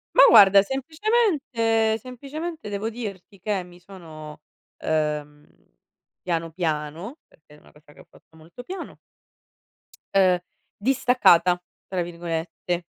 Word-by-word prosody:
Ma - - +9
guarda 200 -3 +8
semplicemente 270 - +1
semplicemente 280 +4 -7
devo 205 +2 -3
dirti 200 -4 -8
che 195 -1 -2
mi 175 0 -16
sono, 160 -5 -11 0.4
ehm, 150 -1 -2 0.8
piano 165 -2 -2
piano, 160 - -3
perché 150 -1 -21
è 150 - -19
una - - -21
cosa 150 0 -20
che - - -20
ho - - -16
fatto 160 - -23
molto 165 +9 -13
piano 375 +7 -7 1.2
ehm 185 -2 +4 0.4
"distaccata", 205 -8 +3 0.3
tra 185 -2 -2
virgolette. 170 0 -4
185 Hz, 115 wpm, -24 LUFS, 165-240 Hz, 1.2 s, Ma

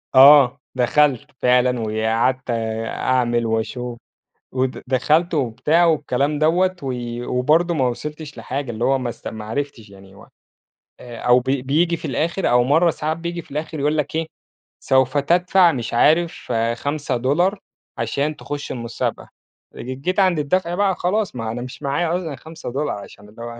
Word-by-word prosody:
آه، 135 -1 +8 0.2
دخلت 140 +2 +2
فعلًا 125 0 +3
وقعدت 115 +4 0
آآ 115 -1 -2
أعمل 120 -2 0
وأشوف، 120 +2 -3 0.6
ود 130 0 -2
دخلت 155 +7 +2
وبتاع 150 +6 +2
والكلام 145 -2 +1
دوّة، 180 +4 +2
و 130 -2 -2 0.4
وبرضه 155 +7 +2
ما 130 -4 +2
وصلتش 150 +2 -7
لحاجة، 130 +3 -4
اللي 115 +1 -3
هو 135 0 +3
ما 125 - -3
اسـت 120 - -7
ما 110 -1 -7
عرفتش 115 -2 -5
يعني 95 0 -15
و - - -16 0.7
أو 125 +1 +1
ب 125 - -9
بييجي 140 +6 +1
في 165 - -9
الآخر 165 +7 -1
أو 120 0 +4
مَرّة 160 +6 +3
ساعات 155 0 -2
بييجي 170 0 -4
في - - -21
الآخر 155 +1 -4
يقول 150 +2 +1
لك 150 +1 -2
إيه، 160 0 -1 0.5
سوف 130 +1 +2
تدفع 175 +4 +4
مش 120 -5 -4
عارف 160 +7 +2 0.2
$5 145 - 0 0.4
عشان 150 +2 -1
تخش 145 0 -6
المسابقة، 115 -2 -4 0.5
ج - - -11 0.2
جيت 185 +5 -1
عند 185 -4 +3
الدفع 170 +4 0
بقى 195 -1 +1
خلاص 190 -1 -1
ما 115 -2 -3
أنا 120 - -5
مش 125 +4 -10
معايا 160 +5 0
اصلًا 160 -6 -5
$5 150 -6 -5
عشان 100 0 -13
اللي 110 +2 -14
هو 120 0 -7
140 Hz, 160 wpm, -21 LUFS, 120-160 Hz, 0.7 s, آه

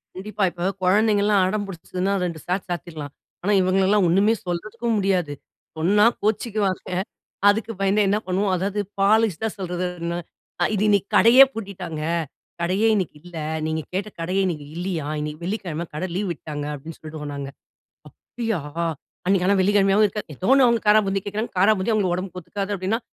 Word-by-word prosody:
கண்டிப்பா. 205 +2 -3
இப்போ 175 +1 -6 0.2
குழந்தைங்கள்லாம் 205 0 +3
அடம் 205 +1 -1
புடிச்சிதுன்னா, 185 +1 -3
2 170 -3 -4
சாத்து 180 +2 -1
சாத்திடலாம். 160 -5 -5 0.3
ஆனா 205 +3 +2
இவங்களலாம் 190 +2 +3
ஒண்ணுமே 200 +6 +4
சொல்றதுக்கும் 215 +6 -2
முடியாது. 185 -7 +1 0.4
சொன்னா 200 +6 +4 0.2
கோவிச்சுக்குவாங்க. 210 -3 -1 0.6
அதுக்கு 220 +2 +1
பயந்தே 195 +2 +3
என்ன 205 - +3
பண்ணுவோம்? 190 +1 0
அதாவது 195 +3 -2 0.2
பாலிஷ்டா 220 0 +3
சொல்றது. 180 -1 -2 0.9
"இது 205 0 +1
இன்னைக்கு 200 -1 +2
கடையே 245 +4 +8
பூட்டிட்டாங்க. 190 -7 -6 0.6
கடையே 190 +6 +2
இன்னைக்கு 185 -7 -2
இல்ல. 175 -2 -10 0.3
நீங்க 160 0 -1
கேட்ட 200 +3 -2
கடையே 185 +4 0
இன்னிக்கு 155 -5 -3
இல்லியாம். 170 -5 -3
இன்னிக்கு 150 +2 -5
வெள்ளிக்கிழமை. 175 -5 -3
கடை 185 +5 -2
லீவ் 200 +2 -1
விட்டாங்க." 150 -2 -6
அப்படின்னு 155 +3 -9
சொல்டுவோம் 155 -2 -7
நாங்க. 140 -1 -5 0.9
அப்டியா? 225 -6 0 0.7
அன்னைக்கு 185 -1 +3
ஆனா 200 - +4
வெள்ளிக்கிழமையாவும் 200 +1 +4
இருக்காது. 210 0 -6
ஏதோ 185 - -3
ஒண்ணு, 270 -1 +6
அவுங்க 235 -1 +3
காரா 210 +1 +7
பூந்தி 195 0 0
கேக்கிறாங்க. 210 +3 -3
காராபூந்தி 195 +1 +3
அவுங்களுக்கு 195 -5 +1
உடம்புக்கு 185 -1 -5
ஒத்துக்காது 195 +3 -5
அப்படின்னா, 195 +5 -1
195 Hz, 150 wpm, -23 LUFS, 175-210 Hz, 0.9 s, கடையே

